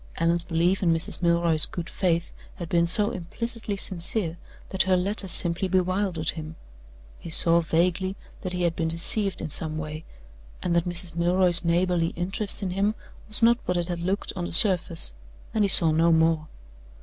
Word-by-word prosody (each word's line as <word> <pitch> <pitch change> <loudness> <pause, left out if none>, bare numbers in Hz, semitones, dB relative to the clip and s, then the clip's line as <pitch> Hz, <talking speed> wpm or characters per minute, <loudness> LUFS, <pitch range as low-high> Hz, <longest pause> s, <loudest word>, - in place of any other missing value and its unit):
Allan's 170 +1 0
belief 175 +3 0
in 175 -3 +2
Mrs. 165 +1 -2
Milroy's 170 -2 +2
good 170 -2 -6
faith 170 -3 -1 0.2
had 170 -3 -8
been 170 -1 +2
so 205 +4 +2
implicitly 220 +4 -5
sincere 175 -1 -4 0.3
that 190 - 0
her 185 -1 +3
letter 195 +2 -1
simply 175 +1 +1
bewildered 185 -2 0
him. 160 0 -9 0.6
He - - -10
saw 165 +1 +3
vaguely 180 +4 -1 0.3
that 185 -1 -5
he 180 0 -2
had 170 -1 0
been 165 - -2
deceived 185 +5 -1
in 155 - -6
some 155 +1 -2
way, 155 0 -6 0.6
and 175 -1 -1
that 170 +1 0
Mrs. 175 -1 0
Milroy's 175 +1 +4
neighborly 170 0 0
interest 195 +4 -1
in 185 - -3
him 200 +4 -1 0.3
was 215 +2 +6
not 235 +1 +4
what 180 - -1
it 175 0 -2
had 175 -1 -4
looked 190 +4 -3
on 175 -2 -4
the - - -6
surface; 170 - +5 0.4
and 215 - +1
he - - +3
saw 170 -4 +4
no 165 +2 +2
more. 160 -1 +1
175 Hz, 180 wpm, -25 LUFS, 165-190 Hz, 0.6 s, was